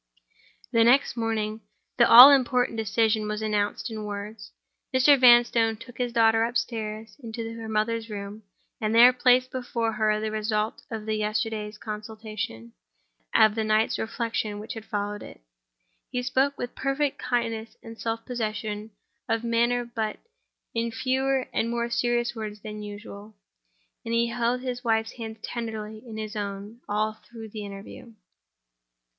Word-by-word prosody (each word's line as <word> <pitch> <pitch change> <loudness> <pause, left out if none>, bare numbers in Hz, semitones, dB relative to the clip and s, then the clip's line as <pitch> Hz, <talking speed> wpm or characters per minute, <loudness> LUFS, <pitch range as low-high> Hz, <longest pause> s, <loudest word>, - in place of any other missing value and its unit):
The 230 -2 +4
next 250 +4 +4
morning 220 -2 -2 0.4
the 235 -2 +5
all 250 +4 +12
important 250 -3 +2
decision 220 0 +1
was 210 +1 -3
announced 210 +2 -1
in 215 -1 -5
words. 205 +1 -7 0.4
Mr. 260 +2 +6
Vanstone 240 -3 +5
took 245 +3 -13
his 245 -1 -1
daughter 225 -1 +4
upstairs 225 -2 -3
into 230 -2 -6
her 225 -1 -7
mother's 225 +1 -1
room, 205 +1 -7 0.4
and 215 +1 0
there 245 +2 +8
placed 250 0 +3
before 235 -3 -2
her 215 -1 +1
the 215 0 -3
result 215 0 -1
of 220 -2 -5
the 220 - -1
yesterday's 215 0 -2
consultation, 215 - -6 0.6
and - - +5
of 215 -1 +5
the 220 0 -1
night's 215 +1 +1
reflection 220 -2 -2
which 210 +2 -6
had 225 -1 -8
followed 205 0 -3
it. - - -11 0.7
He 250 0 -2
spoke 265 +3 +1
with 245 - -5
perfect 275 +1 -1
kindness 230 -2 -2
and 225 0 -9
self 225 0 -3
possession 215 -3 -4 0.4
of 225 0 0
manner—but 235 -1 0 0.6
in 230 0 -1
fewer 265 +2 0
and 230 - 0
more 235 0 -2
serious 240 0 +1
words 210 -2 -6
than 210 0 -7
usual; 205 0 -9 0.7
and 230 0 -2
he 235 0 +2
held 240 +1 0
his 250 -1 -4
wife's 225 -1 +1
hand 220 -2 -7
tenderly 220 -2 -5
in 225 -3 -9
his 215 0 -5
own 205 +2 -5
all 215 +1 0
through 225 -2 -10
the 210 0 -7
interview. 200 +3 -10
225 Hz, 150 wpm, -26 LUFS, 215-240 Hz, 0.7 s, all